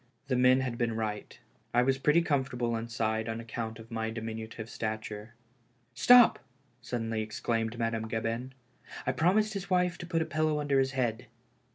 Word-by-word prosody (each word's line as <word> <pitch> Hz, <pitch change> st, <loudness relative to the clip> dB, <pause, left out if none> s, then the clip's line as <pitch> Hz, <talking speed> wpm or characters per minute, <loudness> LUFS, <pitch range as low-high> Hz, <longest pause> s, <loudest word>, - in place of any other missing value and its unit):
The 130 Hz, -, +2 dB
men 125 Hz, +1 st, +5 dB
had 125 Hz, -3 st, -3 dB
been 115 Hz, -2 st, 0 dB
right. 110 Hz, -2 st, -4 dB, 0.4 s
I 120 Hz, -, +5 dB
was 135 Hz, +1 st, +1 dB
pretty 150 Hz, +5 st, +4 dB
com 145 Hz, -5 st, +2 dB
fortable 120 Hz, -3 st, -2 dB
inside 115 Hz, -1 st, -2 dB
on 115 Hz, 0 st, -3 dB
account 115 Hz, -1 st, -5 dB
of 115 Hz, +1 st, -13 dB
my 110 Hz, -1 st, -2 dB
diminutive 110 Hz, 0 st, -6 dB
stature. 110 Hz, -1 st, -5 dB, 0.3 s
" 120 Hz, 0 st, -40 dB
Stop! 245 Hz, -, +7 dB, 0.2 s
" 125 Hz, -3 st, -38 dB
suddenly 115 Hz, -2 st, -2 dB
exclaimed 115 Hz, +1 st, -2 dB
Madame 115 Hz, -1 st, -1 dB
Gabin. 115 Hz, +3 st, -3 dB, 0.3 s
" -, -, -12 dB
I -, -, +2 dB
promised 210 Hz, +6 st, +2 dB
his 195 Hz, -1 st, -5 dB
wife 180 Hz, -1 st, +1 dB
to 175 Hz, -, -7 dB
put 165 Hz, -2 st, +1 dB
a -, -, -6 dB
pillow 155 Hz, -1 st, 0 dB
under 145 Hz, -2 st, +2 dB
his 135 Hz, 0 st, +1 dB
head." 120 Hz, -4 st, -1 dB
120 Hz, 185 wpm, -30 LUFS, 115-135 Hz, 0.4 s, Stop